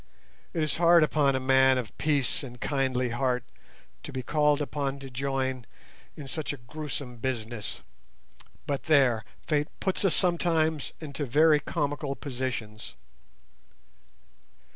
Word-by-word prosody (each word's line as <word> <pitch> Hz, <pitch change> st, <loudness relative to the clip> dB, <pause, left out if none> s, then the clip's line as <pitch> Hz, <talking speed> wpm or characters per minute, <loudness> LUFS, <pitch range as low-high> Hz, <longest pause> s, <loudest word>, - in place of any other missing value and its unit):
It 165 Hz, -3 st, 0 dB
is 155 Hz, -, -1 dB
hard 170 Hz, -1 st, +6 dB
upon 145 Hz, -3 st, +2 dB
a -, -, +1 dB
man 130 Hz, 0 st, +4 dB
of 120 Hz, -4 st, -4 dB
peace 145 Hz, -5 st, +1 dB
and 125 Hz, -3 st, -9 dB
kindly 130 Hz, -3 st, 0 dB
heart 125 Hz, 0 st, 0 dB, 0.6 s
to -, -, -8 dB
be 130 Hz, -1 st, -4 dB
called 150 Hz, +1 st, +2 dB
upon 140 Hz, -2 st, -2 dB
to 135 Hz, -1 st, -9 dB
join 130 Hz, -1 st, -2 dB, 0.5 s
in 145 Hz, -, -8 dB
such 155 Hz, +1 st, -3 dB
a -, -, -7 dB
gruesome 135 Hz, 0 st, -6 dB
business. 115 Hz, -3 st, -4 dB, 0.8 s
But 140 Hz, -2 st, -2 dB
there, 130 Hz, -7 st, +4 dB, 0.2 s
fate 150 Hz, -1 st, +1 dB
puts 190 Hz, +1 st, 0 dB
us 195 Hz, -, +3 dB
sometimes 165 Hz, -4 st, +1 dB
into 145 Hz, -2 st, -5 dB
very 150 Hz, +4 st, +5 dB
comical 145 Hz, -3 st, -2 dB
positions! 125 Hz, -6 st, -5 dB
140 Hz, 130 wpm, -28 LUFS, 130-150 Hz, 0.8 s, hard